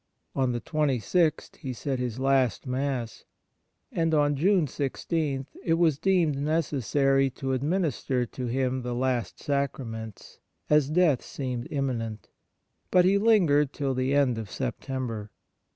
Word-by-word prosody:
On 130 Hz, -2 st, +1 dB
the 120 Hz, -1 st, -3 dB
26th 155 Hz, -, 0 dB
he 130 Hz, -2 st, -5 dB
said 130 Hz, +1 st, -3 dB
his 125 Hz, -2 st, -3 dB
last 130 Hz, -4 st, +2 dB
Mass, 130 Hz, -3 st, -3 dB, 0.7 s
and 165 Hz, -1 st, +1 dB
on 145 Hz, -1 st, +3 dB
June 180 Hz, +3 st, +3 dB
16 140 Hz, 0 st, -2 dB, 0.2 s
it 165 Hz, -, +2 dB
was 165 Hz, -4 st, +2 dB
deemed 175 Hz, -7 st, +2 dB
necessary 140 Hz, -3 st, +1 dB
to 135 Hz, +1 st, -3 dB
administer 140 Hz, -3 st, 0 dB
to 125 Hz, +1 st, -6 dB
him 130 Hz, +1 st, 0 dB
the 120 Hz, 0 st, -3 dB
last 125 Hz, -1 st, -1 dB
Sacraments, 115 Hz, -6 st, -4 dB, 0.3 s
as 150 Hz, -2 st, +4 dB
death 155 Hz, -5 st, +3 dB
seemed 125 Hz, -3 st, -5 dB
imminent; 120 Hz, -6 st, -3 dB, 0.6 s
but 180 Hz, -1 st, +5 dB
he 195 Hz, +2 st, +4 dB
Hngered 170 Hz, -11 st, +4 dB
till 140 Hz, -2 st, -1 dB
the 130 Hz, +2 st, 0 dB
end 130 Hz, -5 st, +2 dB
of 110 Hz, -3 st, -6 dB
September. 125 Hz, -4 st, -4 dB
135 Hz, 135 wpm, -27 LUFS, 125-150 Hz, 0.7 s, but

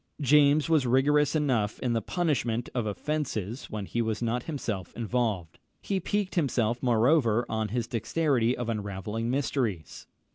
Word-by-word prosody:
James 145 Hz, +1 st, +4 dB
was 155 Hz, -6 st, +3 dB
rigorous 145 Hz, +4 st, +3 dB
enough 125 Hz, -9 st, +1 dB
in 125 Hz, -2 st, -1 dB
the 115 Hz, -, 0 dB
punishment 125 Hz, -9 st, -1 dB
of 120 Hz, -4 st, -1 dB
offences 120 Hz, -2 st, -3 dB
when 105 Hz, -2 st, -4 dB
he 120 Hz, -, -2 dB
was 110 Hz, -2 st, -1 dB
not 120 Hz, +1 st, -1 dB
himself 110 Hz, -, -4 dB
involved. 110 Hz, -7 st, -2 dB, 0.2 s
He 195 Hz, -1 st, -2 dB
piqued 205 Hz, +1 st, -1 dB
himself, 120 Hz, -, 0 dB
moreover, 120 Hz, -1 st, +3 dB
on 110 Hz, -1 st, -1 dB
his 115 Hz, +2 st, -2 dB
dexterity 120 Hz, +1 st, +1 dB
in 120 Hz, -, -4 dB
unravelling 105 Hz, +1 st, -3 dB
mysteries. 125 Hz, -, -2 dB
120 Hz, 145 wpm, -28 LUFS, 110-145 Hz, 0.2 s, James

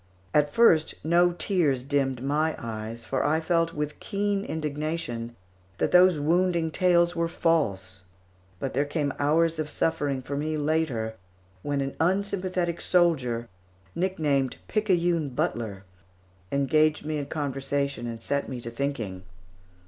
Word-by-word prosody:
At 150 Hz, -1 st, +3 dB
first 160 Hz, -6 st, +4 dB
no 175 Hz, +2 st, +4 dB
tears 160 Hz, -9 st, +1 dB
dimmed 135 Hz, -2 st, 0 dB
my 155 Hz, +3 st, +1 dB
eyes, 115 Hz, 0 st, -6 dB
for 135 Hz, -, -1 dB
I 155 Hz, +2 st, +2 dB
felt, 165 Hz, 0 st, +1 dB
with 150 Hz, 0 st, -3 dB
keen 200 Hz, 0 st, -1 dB
indignation, 150 Hz, -, -3 dB, 0.4 s
that -, -, 0 dB
those 180 Hz, -2 st, +6 dB
wounding 170 Hz, +1 st, +1 dB
tales 175 Hz, 0 st, +3 dB
were 170 Hz, 0 st, +1 dB
false; 100 Hz, -, 0 dB, 0.6 s
but 135 Hz, -, -3 dB
there 140 Hz, -, +2 dB
came 145 Hz, -1 st, -1 dB
hours 160 Hz, +3 st, +2 dB
of 155 Hz, -1 st, -2 dB
suffering 140 Hz, -5 st, -1 dB
for 140 Hz, +3 st, -4 dB
me 155 Hz, +2 st, -1 dB
later, 145 Hz, -7 st, 0 dB, 0.5 s
when 145 Hz, +3 st, -1 dB
an 135 Hz, 0 st, -3 dB
unsympathetic 185 Hz, -1 st, 0 dB
soldier, 135 Hz, -10 st, +2 dB, 0.5 s
nicknamed 150 Hz, -8 st, 0 dB
"Picayune 175 Hz, -7 st, +1 dB
Butler," 105 Hz, -7 st, -2 dB, 0.7 s
engaged 150 Hz, +3 st, +2 dB
me 155 Hz, -1 st, -2 dB
in 140 Hz, -, -4 dB
conversation 140 Hz, -3 st, -2 dB
and 115 Hz, -1 st, -5 dB
set 140 Hz, +4 st, -2 dB
me 130 Hz, -2 st, -5 dB
to 115 Hz, -, -6 dB
thinking. 115 Hz, -8 st, -3 dB
150 Hz, 135 wpm, -26 LUFS, 135-170 Hz, 0.7 s, those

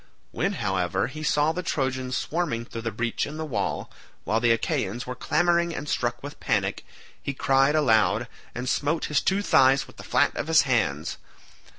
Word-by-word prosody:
When, 200 Hz, -, -1 dB
however, 95 Hz, -, 0 dB
he 140 Hz, +5 st, -7 dB
saw 150 Hz, 0 st, +2 dB
the 180 Hz, +3 st, -3 dB
Trojans 130 Hz, -5 st, -1 dB
swarming 150 Hz, -9 st, -2 dB
through 115 Hz, -, -7 dB
the 115 Hz, -, -2 dB
breach 115 Hz, +2 st, -2 dB
in 150 Hz, +2 st, -7 dB
the 160 Hz, -, -3 dB
wall, 145 Hz, -, -2 dB, 0.3 s
while 110 Hz, -, +1 dB
the 120 Hz, 0 st, +2 dB
Achaeans 115 Hz, 0 st, 0 dB
were 125 Hz, -, -4 dB
clamouring 170 Hz, +5 st, +1 dB
and 145 Hz, -, -5 dB
struck 120 Hz, -2 st, -1 dB
with 145 Hz, +1 st, -8 dB
panic, 100 Hz, -4 st, 0 dB, 0.4 s
he 140 Hz, -, -4 dB
cried 135 Hz, +2 st, +3 dB
aloud, 115 Hz, -5 st, +3 dB, 0.3 s
and 125 Hz, +1 st, -4 dB
smote 150 Hz, +4 st, 0 dB
his 150 Hz, -2 st, +1 dB
two 195 Hz, +1 st, +1 dB
thighs 135 Hz, -5 st, +4 dB
with -, -, -17 dB
the -, -, -9 dB
flat -, -, +2 dB
of -, -, -3 dB
his 160 Hz, 0 st, +5 dB
hands. 110 Hz, -, 0 dB
130 Hz, 185 wpm, -26 LUFS, 115-155 Hz, 0.4 s, his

